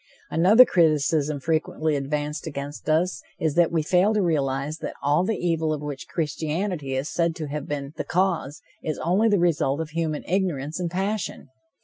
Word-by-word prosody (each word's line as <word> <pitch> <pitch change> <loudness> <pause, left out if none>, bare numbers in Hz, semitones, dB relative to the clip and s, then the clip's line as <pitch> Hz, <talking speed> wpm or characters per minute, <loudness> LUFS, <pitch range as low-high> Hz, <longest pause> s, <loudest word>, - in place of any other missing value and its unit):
Another 205 +10 +7
criticism 155 - +2
frequently 155 0 0
advanced 150 +2 -3
against 145 0 -6
us 170 +4 +1 0.2
is 160 -2 0
that 170 0 +3
we 165 -2 +1
fail 185 +6 +3
to 210 - +3
realize 145 -2 -1
that - - -5
all 145 +5 +3
the 215 +3 -1
evil 165 -2 0
of 150 -1 -3
which 145 -2 -6
Christianity 160 -1 -2
is 135 +3 -1
said 170 -1 0
to 155 - -5
have 150 0 -4
been 140 -1 -4
the - - -2
cause, 170 -5 -1 0.2
is 155 - -3
only 195 +7 +2
the 205 - +4
result 160 -5 +1
of 160 -1 -3
human 160 -2 -2
ignorance 165 -5 -1
and 175 -2 -1
passion. 195 -2 -3
160 Hz, 175 wpm, -25 LUFS, 145-175 Hz, 0.2 s, Another